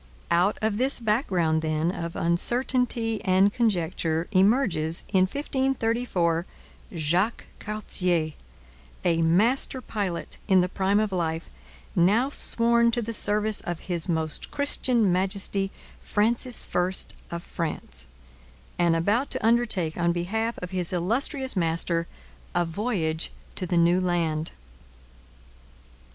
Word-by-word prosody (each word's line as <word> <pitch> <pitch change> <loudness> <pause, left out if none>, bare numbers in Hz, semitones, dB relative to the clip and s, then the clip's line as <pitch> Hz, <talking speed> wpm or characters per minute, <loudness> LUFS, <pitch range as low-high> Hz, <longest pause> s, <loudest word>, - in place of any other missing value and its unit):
Out 180 +5 +3
of 215 -1 0
this 265 +1 +2
background, 190 - +1
then, 155 +1 0
of 170 -2 -5
uncertainty 230 +5 +1
and 190 +2 +3
conjecture 175 -7 0
emerges, 190 - +2
in 185 -1 +3
1534, 235 - -1 0.5
Jacques 175 +8 0
Cartier, 180 -6 0 0.7
a 165 -2 +2
master 220 +11 +2
pilot 200 -8 -4
in 190 -3 +5
the 180 - +1
prime 195 +2 +1
of 215 -2 0
life, 165 -3 -2 0.4
now 210 +10 +3
sworn 235 -2 +3
to 235 0 -1
the 230 +2 -4
service 210 0 +2
of 175 -2 -5
His 175 -2 -1
Most 160 -2 -2
Christian 250 -7 +1
Majesty 195 +1 0 0.3
Francis 235 +3 +1
I 180 +1 +1 0.4
of 170 0 -5
France, 70 - -5 0.7
and 170 -1 +3
about 205 +11 +1
to - - -3
undertake 225 -9 +1
on 170 0 +2
behalf 220 +7 -2
of 180 - -6
his 180 -3 -1
illustrious 250 - +1
master 165 -1 0 0.5
a 175 - +2
voyage 165 -3 -2 0.2
to 185 - -3
the 175 - 0
New 170 +2 +4
Land. 165 -3 0
185 Hz, 120 wpm, -26 LUFS, 170-225 Hz, 0.7 s, in